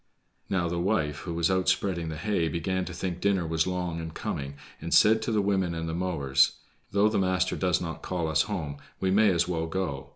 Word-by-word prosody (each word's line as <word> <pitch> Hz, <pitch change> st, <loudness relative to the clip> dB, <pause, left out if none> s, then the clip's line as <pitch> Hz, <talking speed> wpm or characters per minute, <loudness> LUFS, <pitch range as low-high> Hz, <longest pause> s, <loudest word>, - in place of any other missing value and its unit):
Now, 90 Hz, -3 st, +1 dB
the 85 Hz, +1 st, -2 dB
wife, 75 Hz, -5 st, 0 dB
who 85 Hz, -, -5 dB
was 85 Hz, +2 st, +2 dB
out 95 Hz, 0 st, +2 dB
spreading 90 Hz, -3 st, 0 dB
the 80 Hz, -, -5 dB
hay, 85 Hz, -1 st, 0 dB
began 90 Hz, +3 st, -1 dB
to -, -, -6 dB
think 90 Hz, 0 st, -4 dB
dinner 95 Hz, -4 st, +2 dB
was 80 Hz, +1 st, 0 dB
long 90 Hz, -2 st, -2 dB
in 80 Hz, 0 st, -5 dB
coming, 70 Hz, -3 st, -4 dB, 0.3 s
and 85 Hz, -, -5 dB
said 110 Hz, +4 st, +6 dB
to 115 Hz, -, -2 dB
the 105 Hz, -2 st, +2 dB
women 95 Hz, -4 st, +1 dB
and 80 Hz, 0 st, -3 dB
the 80 Hz, -, -3 dB
mowers: 75 Hz, -6 st, +2 dB, 0.4 s
"Though 100 Hz, +2 st, +3 dB
the 110 Hz, -, +1 dB
master 90 Hz, -1 st, +1 dB
does 90 Hz, -1 st, +1 dB
not 80 Hz, -2 st, -5 dB
call 85 Hz, -3 st, -2 dB
us 80 Hz, -, +3 dB
home, 80 Hz, -8 st, -3 dB, 0.2 s
we 95 Hz, -1 st, +1 dB
may 105 Hz, +2 st, +5 dB
as 85 Hz, -2 st, +2 dB
well 80 Hz, -2 st, -1 dB
go. 80 Hz, -6 st, -3 dB
90 Hz, 225 wpm, -27 LUFS, 80-95 Hz, 0.4 s, said